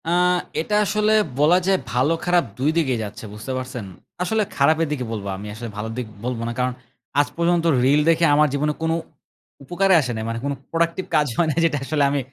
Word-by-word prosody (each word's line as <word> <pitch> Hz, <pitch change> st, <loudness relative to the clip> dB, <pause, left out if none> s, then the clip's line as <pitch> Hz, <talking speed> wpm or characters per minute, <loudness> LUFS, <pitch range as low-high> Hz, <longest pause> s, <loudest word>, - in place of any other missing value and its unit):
আ -, -, 0 dB, 0.5 s
এটা 210 Hz, +6 st, -1 dB
আসলে 215 Hz, +1 st, +1 dB, 0.3 s
বলা 155 Hz, +5 st, +5 dB
যায় 195 Hz, -1 st, +4 dB
ভালো 130 Hz, +6 st, +2 dB
খারাপ 175 Hz, -1 st, +3 dB, 0.2 s
দুই 140 Hz, +4 st, +2 dB
দিকেই 130 Hz, -8 st, +1 dB
যাচ্ছে। 105 Hz, +1 st, -8 dB
বুঝতে 105 Hz, +5 st, -7 dB
পারছেন? 125 Hz, -4 st, -5 dB, 0.4 s
আসলে 220 Hz, +4 st, +1 dB
খারাপের 160 Hz, +3 st, +3 dB
দিকে 130 Hz, -4 st, -2 dB
বলব। 105 Hz, -3 st, -4 dB
আমি 105 Hz, +2 st, -8 dB
আসলে 115 Hz, +2 st, -7 dB
ভালো 110 Hz, +1 st, -4 dB
দিক 125 Hz, -3 st, -3 dB, 0.2 s
বলব 125 Hz, -2 st, -2 dB
না। -, -, -2 dB
কারণ 125 Hz, 0 st, 0 dB, 0.5 s
আজ 145 Hz, -, +3 dB
পর্যন্ত 170 Hz, 0 st, +2 dB, 0.2 s
রিল 145 Hz, +3 st, +4 dB
দেখে 165 Hz, 0 st, +4 dB
আমার 150 Hz, +1 st, +5 dB
জীবনে 150 Hz, +1 st, 0 dB
কোন 160 Hz, 0 st, 0 dB, 0.7 s
উপকারে 190 Hz, +6 st, +2 dB
আসে 130 Hz, -3 st, -3 dB
নাই। 110 Hz, -, -3 dB
মানে 115 Hz, 0 st, -3 dB
কোনো 140 Hz, 0 st, -1 dB, 0.2 s
প্রোডাক্টিভ 170 Hz, +2 st, 0 dB
কাজ 150 Hz, -1 st, +3 dB
হয় 170 Hz, -, +3 dB
না -, -, -4 dB
যেটা 155 Hz, -3 st, +1 dB
আসলে 145 Hz, 0 st, +1 dB
আমি 140 Hz, 0 st, 0 dB
150 Hz, 205 wpm, -22 LUFS, 125-170 Hz, 0.7 s, বলা